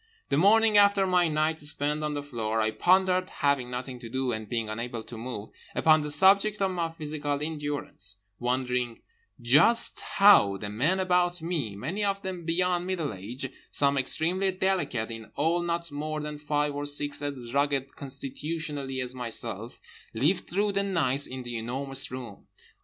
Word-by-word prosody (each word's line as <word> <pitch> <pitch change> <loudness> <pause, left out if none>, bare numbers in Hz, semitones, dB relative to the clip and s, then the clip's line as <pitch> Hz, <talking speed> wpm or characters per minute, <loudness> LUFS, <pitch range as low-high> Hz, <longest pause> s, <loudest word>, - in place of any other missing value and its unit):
The 140 - +1
morning 210 +4 +5
after 200 -1 +5
my 180 -2 +3
night 155 +1 0
spent 150 +1 -1
on 150 -1 -2
the 145 - -3
floor 115 -5 -2
I 110 0 +1
pondered, 185 +4 +2
having 140 -4 0
nothing 125 0 -5
to 115 -2 -9
do 130 +1 -1
and 110 -2 -5
being 115 -2 -2
unable 115 +1 -5
to 120 - -10
move, 115 -2 -6 0.2
upon 155 -1 +4
the 150 - -4
subject 200 +6 +4
of 195 -1 +1
my 170 -2 -1
physical 150 -2 -3
endurance—wondering 125 -4 -3 0.4
just 150 - +4
how 195 - +5
the 105 +1 -5
men 150 - +1
about 180 -2 +1
me, 155 - -2
many 160 - -3
of 200 0 -1
them 185 -3 -5
beyond 180 +1 +1
middle 170 - -2
age, 115 +8 -5 0.2
some 140 -1 +4
extremely 170 +8 +1
delicate, 185 -12 -1
in 115 -1 -7
all 165 +4 +1
not 170 -1 -2
more 155 +2 -3
than 150 0 -5
five 150 0 0
or 145 0 -2
six 145 0 +2
as 130 -5 -5
rugged 140 -1 0
constitutionally 140 0 -4
as 125 0 -4
myself, 125 -3 -5 0.4
lived 155 +11 +1
through 205 +3 +1
the 200 0 0
nights 150 -9 +1
in 130 0 -6
The 120 -1 -4
Enormous 135 +3 -1
Room. 125 -5 -9
145 Hz, 165 wpm, -27 LUFS, 125-175 Hz, 0.4 s, morning